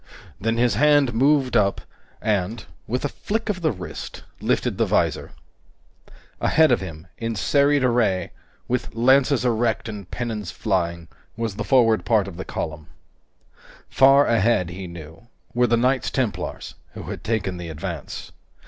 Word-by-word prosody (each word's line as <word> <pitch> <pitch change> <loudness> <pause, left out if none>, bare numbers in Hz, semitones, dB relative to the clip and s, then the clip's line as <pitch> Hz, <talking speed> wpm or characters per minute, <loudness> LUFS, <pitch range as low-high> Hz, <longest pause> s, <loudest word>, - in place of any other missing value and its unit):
Then 115 +2 0
his 120 -2 +3
hand 145 +2 +4
moved 135 +1 +2
up 100 -4 +3 0.4
and, 105 0 -1 0.2
with 125 +5 -2
a - - +3
flick 220 +9 -3
of 185 -3 -2
the 160 - +2
wrist, 90 -5 -8 0.2
lifted - - 0
the - - +4
visor. - - 0 1.1
Ahead 160 0 +4
of - - +3
him, 80 -3 -8
in 115 0 -2
serried 140 +6 +2
array, 110 -8 +1 0.4
with 125 -2 -2
lances 130 +2 +3
erect 115 -2 0
and 105 -4 -7
pennons 110 -6 -4
flying, 85 -5 -2 0.3
was 115 -4 -3
the 105 - -3
forward 115 -3 +3
part 110 -4 +2
of 95 - -8
the 95 - -6
column. 75 -1 -5 1.0
Far 135 +2 +6
ahead, 110 -5 +2
he 90 +1 -7
knew, 85 +4 -11 0.3
were 125 0 +3
the 120 0 +3
Knights 130 +2 +1
Templars, 125 -5 -3 0.2
who - - -8
had - - -7
taken 110 -5 -1
the 85 -1 -6
advance. 80 -1 -6
115 Hz, 150 wpm, -23 LUFS, 95-130 Hz, 1.1 s, Far